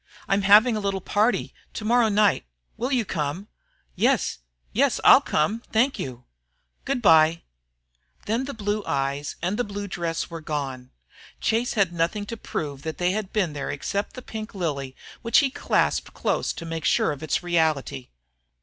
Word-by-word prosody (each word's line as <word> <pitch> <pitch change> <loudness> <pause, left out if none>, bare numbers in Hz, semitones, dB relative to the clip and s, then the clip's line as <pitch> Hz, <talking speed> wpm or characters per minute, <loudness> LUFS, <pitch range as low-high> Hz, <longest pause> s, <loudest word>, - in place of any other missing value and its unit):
"I'm 195 +1 +2
having 210 +4 +6
a - - -1
little 200 -1 -1
party 210 +5 0 0.2
to 215 - -5
morrow 235 0 +4
night. 210 0 +3 0.3
Will 250 +3 -3
you 245 -4 +1
come?" 170 +3 -3 0.5
"Yes, - - +1 0.3
yes, - - +2
I'll - - +8
come 205 +10 0
thank 250 +5 +2
you." 125 -2 -6 0.6
"Good 265 -3 -1
bye." 160 -2 +5 0.8
Then 230 +5 0
the 280 - -6
blue 205 -1 -2
eyes 140 +1 -2
and 180 +3 0
blue 205 0 -5
dress 170 -3 -3
were 165 -1 -7
gone. 135 -5 -4 0.5
Chase 230 +2 0
had 195 -6 +1
nothing 175 +5 -1
to 230 - -6
prove 145 -10 -5
that 160 0 -5
they 180 0 +1
had 205 -1 -3
been 185 -8 0
there 145 -2 -4
except 200 +8 -3
the 255 - -9
pink 220 -2 -7
lily 140 -7 -3 0.3
which 230 -1 +3
he 275 -3 +4
clasped - - 0
close - - 0
to 170 - -8
make 165 -1 -4
sure - - +3
of 145 - -6
its 155 +2 -1
reality. 160 -7 0
190 Hz, 170 wpm, -25 LUFS, 155-215 Hz, 0.8 s, I'll